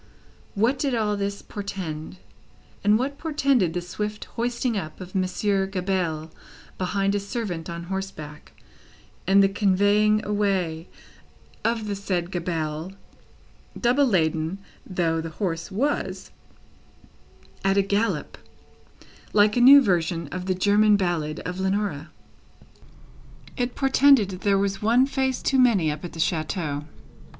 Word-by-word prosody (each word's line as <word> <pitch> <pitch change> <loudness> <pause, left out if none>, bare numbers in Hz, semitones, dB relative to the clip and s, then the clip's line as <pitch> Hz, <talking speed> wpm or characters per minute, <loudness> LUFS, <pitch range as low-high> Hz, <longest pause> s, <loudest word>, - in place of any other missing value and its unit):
What 230 +7 +2
did 275 -4 0
all 210 -2 0
this 200 0 -3
portend, 185 -5 -6 0.7
and 210 +1 +5
what 280 +4 -3
portended 275 - +1
the 175 - -1
swift 210 +4 -5
hoisting 235 0 -1
up 155 -6 -5
of 185 -1 -9
Monsieur 195 +1 0
Gabelle 180 -5 -2 0.5
behind 195 +1 0
a 205 - +1
servant 200 -6 -4
on 170 0 -5
horseback, 170 -5 -7 0.7
and 195 +1 +6
the - - +5
conveying 205 +2 +2
away 190 -5 -1 0.8
of 230 -1 0
the 205 - -2
said 185 -3 -2
Gabelle 165 -1 -3 0.9
(double 260 +3 +3
laden 160 -3 0 0.3
though 165 -4 0
the 165 - -5
horse 165 0 -3
was), 265 +9 -2 1.3
at 195 0 +2
a 200 - +4
gallop, 200 -4 -1 0.9
like 210 0 +4
a 245 - +2
new 275 +3 +9
version 170 - 0
of 185 +2 -5
the 185 - +1
German 205 +2 +4
ballad 165 -5 -2
of 180 +1 -5
Leonora? 190 -6 -1 1.5
It 245 -1 -2
portended 270 -5 +4
that 185 -1 -7
there 200 -1 +3
was 195 0 -1
one 235 +5 +4
stone 275 - -11
face 260 -1 -2
too 270 - +2
many, 205 -11 +4
up 150 +2 -7
at 175 - -7
the 165 - -9
chateau. 155 -3 -1
195 Hz, 135 wpm, -24 LUFS, 175-215 Hz, 1.5 s, new